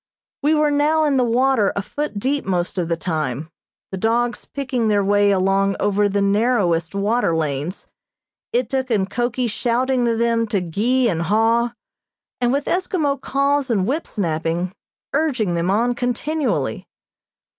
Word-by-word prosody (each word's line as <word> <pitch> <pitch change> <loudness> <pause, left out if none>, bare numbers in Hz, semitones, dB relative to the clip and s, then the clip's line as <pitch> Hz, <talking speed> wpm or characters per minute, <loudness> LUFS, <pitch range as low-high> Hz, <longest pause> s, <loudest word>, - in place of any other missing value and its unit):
We 305 +2 +3
were 300 -1 +2
now 300 +2 +2
in 290 -3 +2
the 255 - +3
water 240 -2 +2
a 200 - -2
foot 290 +1 -4
deep 275 +7 -1
most 180 -1 -1
of 170 - -1
the 170 0 -1
time, 155 -2 -3 0.4
the 190 - -4
dogs 235 +3 0
picking 260 -5 -2
their 205 -2 +2
way 205 +1 +3
along 195 0 +2
over 205 0 +2
the 200 0 0
narrowest 200 -5 +1
water 205 -3 +1
lanes, 155 +3 -3 0.7
Ituk 255 +2 -1
and 200 -5 +1
Koki 240 +3 -1
shouting 245 +3 0
to 230 -1 +1
them 230 0 +1
to 205 -2 0
gee 230 +9 +1
and 170 -7 0
haw, 225 +6 +2 0.7
and 245 -1 +2
with 280 +2 0
Eskimo 330 -6 0
calls 280 0 0
and 200 -6 +1
whip 290 +9 -2
snapping, 170 -1 -2 0.4
urging 265 - +1
them 170 +1 0
on 235 +5 +2
continually. 260 +5 -2
230 Hz, 155 wpm, -21 LUFS, 195-260 Hz, 0.7 s, We